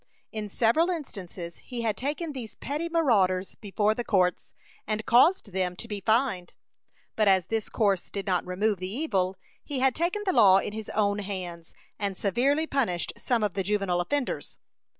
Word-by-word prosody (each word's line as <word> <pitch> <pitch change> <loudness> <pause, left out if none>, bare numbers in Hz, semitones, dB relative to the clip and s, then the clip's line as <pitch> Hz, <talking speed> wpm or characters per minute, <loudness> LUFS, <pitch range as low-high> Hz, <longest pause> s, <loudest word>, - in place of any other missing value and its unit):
In 215 -1 -5
several 240 - +3
instances 185 - -6
he 240 -2 -6
had 220 -3 0
taken 295 - -3
these 240 -5 -7
petty 305 +4 -3
marauders 200 - +2
before 210 +1 0
the 240 - -3
courts, 180 -6 +1 0.3
and 215 0 -2
caused 250 - +4
them 180 -1 -1
to 230 - -8
be 205 -3 -5
fined; 220 -4 +1 0.6
but 215 -1 +2
as 190 -3 +4
this 225 -1 -1
course 200 -5 +1
did 200 -1 -5
not 185 -3 +1
remove 195 +2 0
the 185 0 -4
evil, 195 -8 0 0.3
he 285 - -5
had 260 0 +3
taken 350 - -1
the 375 - +1
law 190 - +7
in 200 - -2
his 220 -1 -6
own 205 -1 +2
hands, 180 -4 -6 0.2
and 200 -2 -2
severely 270 - +1
punished 235 - -1
some 230 -1 0
of 205 -4 0
the 195 - -1
juvenile 195 -2 0
offenders. 280 +8 -2
210 Hz, 175 wpm, -27 LUFS, 190-255 Hz, 0.6 s, law